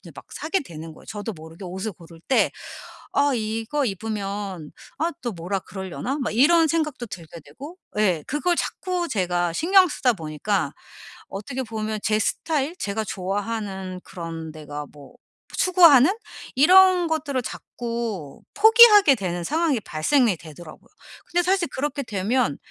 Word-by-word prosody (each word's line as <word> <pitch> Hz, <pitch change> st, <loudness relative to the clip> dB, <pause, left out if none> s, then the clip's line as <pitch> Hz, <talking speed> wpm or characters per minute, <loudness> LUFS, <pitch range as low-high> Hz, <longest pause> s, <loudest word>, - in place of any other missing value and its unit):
이제 -, -, -13 dB
막 -, -, -11 dB
사게 325 Hz, +5 st, -1 dB
되는 160 Hz, -, -9 dB
거예요. -, -, -16 dB
저도 210 Hz, +1 st, -5 dB
모르게 160 Hz, +3 st, -11 dB
옷을 190 Hz, +4 st, -4 dB
고를 165 Hz, -1 st, -15 dB
때 265 Hz, -, +3 dB, 0.6 s
'아 285 Hz, 0 st, +3 dB
이거 225 Hz, +5 st, -1 dB
입으면 200 Hz, -5 st, -4 dB, 0.3 s
아 330 Hz, +2 st, 0 dB
또 240 Hz, -, -2 dB
뭐라 185 Hz, +2 st, -3 dB
그러려나?' 190 Hz, -, -5 dB
막 240 Hz, -, -2 dB
이런 325 Hz, +7 st, +5 dB
생각도 305 Hz, -6 st, -1 dB
들게 170 Hz, -4 st, -10 dB
되고. 275 Hz, -, -11 dB, 0.2 s
예. 185 Hz, -7 st, +2 dB
그걸 345 Hz, +5 st, 0 dB
자꾸 360 Hz, -2 st, -2 dB
제가 175 Hz, -, 0 dB
신경 370 Hz, -, +5 dB
쓰다 255 Hz, -5 st, +1 dB
보니까 160 Hz, -1 st, -2 dB, 0.5 s
어떻게 245 Hz, +7 st, -5 dB
보면 220 Hz, -2 st, -4 dB
제 215 Hz, 0 st, +2 dB
스타일 300 Hz, +7 st, -1 dB
제가 210 Hz, -, -2 dB
좋아하는 195 Hz, -1 st, -4 dB
그런 165 Hz, -2 st, -7 dB
데가 150 Hz, -1 st, -7 dB
뭐 145 Hz, -2 st, -15 dB, 0.4 s
추구하는 340 Hz, -6 st, +6 dB, 0.4 s
이런 365 Hz, +4 st, +6 dB
것들을 295 Hz, -5 st, -1 dB
자꾸 230 Hz, -, -5 dB
포기하게 430 Hz, -, +8 dB
되는 175 Hz, -5 st, -3 dB
상황이 310 Hz, -, +1 dB
발생이 210 Hz, -, +1 dB
되더라고요. 155 Hz, 0 st, -13 dB, 0.4 s
근데 350 Hz, +1 st, +1 dB
사실 370 Hz, 0 st, +1 dB
그렇게 280 Hz, +2 st, -3 dB
되면 220 Hz, -, 0 dB
220 Hz, 305 characters per minute, -23 LUFS, 180-295 Hz, 0.6 s, 포기하게